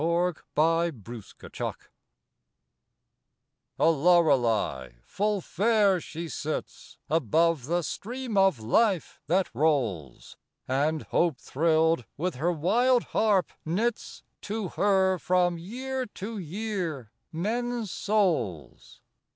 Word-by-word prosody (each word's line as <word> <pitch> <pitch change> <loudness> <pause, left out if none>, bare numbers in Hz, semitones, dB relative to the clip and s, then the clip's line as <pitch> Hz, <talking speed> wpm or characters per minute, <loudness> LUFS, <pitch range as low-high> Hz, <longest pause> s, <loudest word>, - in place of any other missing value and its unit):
WORLD'S 170 +1 0 0.2
ATTAINMENT 155 - -2 2.0
A - - +3
Lorelei 135 - +2
full 205 - -1
fair 205 -1 +2
she 165 +2 -6
sits 155 -1 -5
Above 160 0 +2
the 175 +2 0
Stream 240 - -5
of 195 - +4
Life 180 - +1
that 180 0 +1
rolls; 115 - -1 0.3
And, 145 +4 0
hope 170 -6 +1
thrilled, 160 0 +1
with 175 -1 -2
her 165 +6 +1
wild 235 - +2
harp 205 -5 +2
knits 215 +9 -2 0.2
To 210 -2 -4
her 190 -2 +2
from 175 -1 +1
year 255 +7 -4
to 210 +1 -7
year 175 - -4 0.2
men's 230 +4 -2
souls. 170 - -1
175 Hz, 95 wpm, -27 LUFS, 150-205 Hz, 2.0 s, of